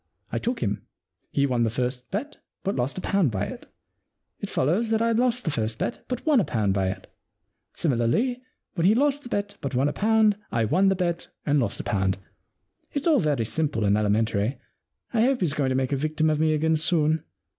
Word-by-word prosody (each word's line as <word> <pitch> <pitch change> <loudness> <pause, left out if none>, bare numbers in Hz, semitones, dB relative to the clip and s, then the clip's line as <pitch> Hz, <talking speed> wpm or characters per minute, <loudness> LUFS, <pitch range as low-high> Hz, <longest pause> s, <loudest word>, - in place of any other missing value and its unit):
I - - -1
took 240 +1 -2
him. 105 -2 -2 0.4
He 140 - +1
won 125 -3 0
the 115 - +3
first 125 +2 -3
bet 275 +10 -4 0.3
but 195 - -1
lost 130 +5 -2
a - - -3
pound 195 -7 +2
by 100 -2 -1
it. - - -9 0.7
It - - -5
follows 180 - +1
that 220 0 +2
I 230 0 +2
lost 245 +1 +2
the 160 - +1
first 110 -4 -1
bet 240 - -3
but 250 -1 -4
won 300 -5 +5
a - - +3
pound 105 - 0
by 95 -1 +1
it. 95 - -4 0.7
Similarly, 165 - +1 0.3
when 170 0 +2
he 210 - +5
lost 285 +2 +2
the 245 - -10
bet 205 -3 -2
but 135 -2 -3
won 135 +3 +3
a 145 - -1
pound 215 -1 +3
I 115 -1 +1
won 190 - +3
the 195 - +2
bet 175 -2 -2 0.2
and 145 0 +3
lost 115 -6 -1
a - - -11
pound. 95 -2 0 0.8
It's 285 -1 -2
all 315 -5 +5
very 145 - +1
simple 115 -3 -1
and 100 0 +4
elementary. 105 +3 +1 0.6
I 225 - +3
hope 255 +1 +2
he's 165 -6 +1
going 140 -3 0
to 130 - 0
make 130 0 0
a 140 - +1
victim 155 +2 +1
of 150 - 0
me 155 0 +3
again 160 +1 +2
soon. 155 -1 +1
155 Hz, 220 wpm, -25 LUFS, -, 0.8 s, won